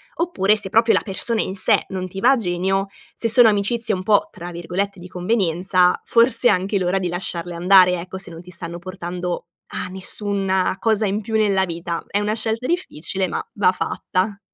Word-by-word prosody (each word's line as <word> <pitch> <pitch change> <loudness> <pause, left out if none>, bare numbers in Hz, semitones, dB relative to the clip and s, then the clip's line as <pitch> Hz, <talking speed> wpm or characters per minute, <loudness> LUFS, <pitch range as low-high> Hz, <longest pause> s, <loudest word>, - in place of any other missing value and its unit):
oppure, 215 - +1
se 205 -2 -2
proprio 225 +3 +4
la - - +2
persona 220 +3 0
in 190 - -4
sé 205 +2 +3
non 185 -1 -4
ti 190 +1 -7
va 250 - +6
a - - +5
genio, 190 -1 -1 0.3
se 230 - -1
sono 230 0 +7
amicizie 215 +2 0
un 185 -1 -3
pò, 205 +1 +3
tra 175 0 -8
virgolette, 180 +3 -3
"di 180 - -9
convenienza" 180 -1 +1
forse 235 +1 +3
è - - +6
anche 190 +3 0
l'ora 180 +1 0
di 185 - -2
lasciarle 175 0 -4
andare, 180 0 +5
ecco, 185 +2 -7
se 190 -2 -6
non 165 0 -10
ti 180 +1 -13
stanno 170 0 -5
portando 180 -1 -5 0.2
a - - -5
nessuna 190 0 0
cosa 220 0 +2
in 205 +2 -1
più 220 +1 -4
nella 200 -3 +2
vita; 170 -1 -5
è 200 - -1
una 210 +1 -1
scelta 225 +2 -2
difficile, 195 - -2
ma - - -4
va 195 -3 +3
fatta. 190 +2 -2
190 Hz, 200 wpm, -21 LUFS, 180-215 Hz, 0.3 s, sono